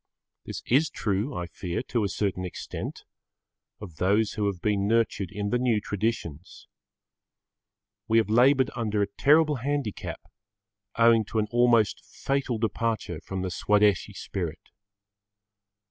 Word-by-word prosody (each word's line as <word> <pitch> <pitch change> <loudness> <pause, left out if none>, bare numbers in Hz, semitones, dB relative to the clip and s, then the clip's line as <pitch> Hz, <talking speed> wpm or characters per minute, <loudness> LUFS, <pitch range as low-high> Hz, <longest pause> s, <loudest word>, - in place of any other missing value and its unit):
This - - -6
is 145 +5 +3
true, 105 +1 -2
I 90 - -3
fear, 85 +3 -4
to 120 -3 +1
a 100 - 0
certain 95 -2 -2
extent, 90 - -6 0.8
of 90 -7 -10
those 100 +3 +2
who 105 -1 -1
have 100 -3 -2
been 100 0 0
nurtured 110 -4 +1
in 100 0 -3
the 125 - +2
new 120 -4 +2
traditions. 105 -7 -4 1.4
We 115 - +3
have 115 - +3
laboured 130 +4 +4
under 105 -3 0
a - - -1
terrible 150 0 +4
handicap 140 -3 -3 0.8
owing 115 -1 +5
to 110 - -5
an 110 - +2
almost 120 -3 +3
fatal 135 -3 -2
departure 110 -5 -2
from 95 -1 -5
the 95 - -3
Swadeshi 105 +2 +2
spirit. 85 -4 -5
110 Hz, 135 wpm, -27 LUFS, 100-120 Hz, 1.4 s, owing